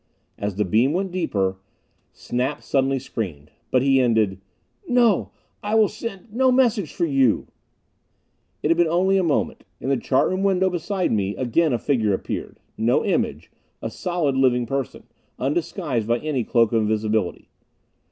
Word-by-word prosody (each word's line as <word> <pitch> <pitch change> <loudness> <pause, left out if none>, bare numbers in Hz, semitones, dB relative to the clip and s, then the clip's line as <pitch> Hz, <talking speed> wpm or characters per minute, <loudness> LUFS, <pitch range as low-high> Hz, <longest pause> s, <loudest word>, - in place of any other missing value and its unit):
As 100 -1 -3
the 105 +1 0
beam 115 - +2
went 190 +1 -1
deeper, 100 - -1 0.5
Snap 130 +4 -3
suddenly 135 0 +1
screamed. 95 - -6 0.2
But 130 0 +2
he 135 -1 +4
ended, 110 -6 +1 0.5
"No! 240 - +3 0.3
I 210 +1 -1
will 220 -2 +5
send 215 -1 -8
no 260 +2 +3
message 235 - +2
for 175 - -1
you 135 -7 +2 0.6
" - - -46
It 150 - +1
had 165 - +3
been 175 -1 +4
only 185 +4 +2
a - - +1
moment. 160 -4 0 0.2
In 130 - -4
the 135 - +2
chart 130 +2 +2
room 185 +1 -1
window 190 -1 +2
beside 180 +2 -1
me 100 -2 0
again 135 +6 +1
a 120 - +1
figure 110 -5 +1
appeared! - - -6 0.2
No 115 +2 +2
image. - - -1 0.3
A - - -5
solid, 170 -6 -1
living 125 -2 +3
person, 135 +1 -4 0.3
undisguised 140 - -2
by 120 +1 +2
any 140 -2 -2
cloak 115 -1 +2
of 115 -1 +2
invisibility. 110 -2 -1
135 Hz, 160 wpm, -23 LUFS, 115-180 Hz, 0.6 s, will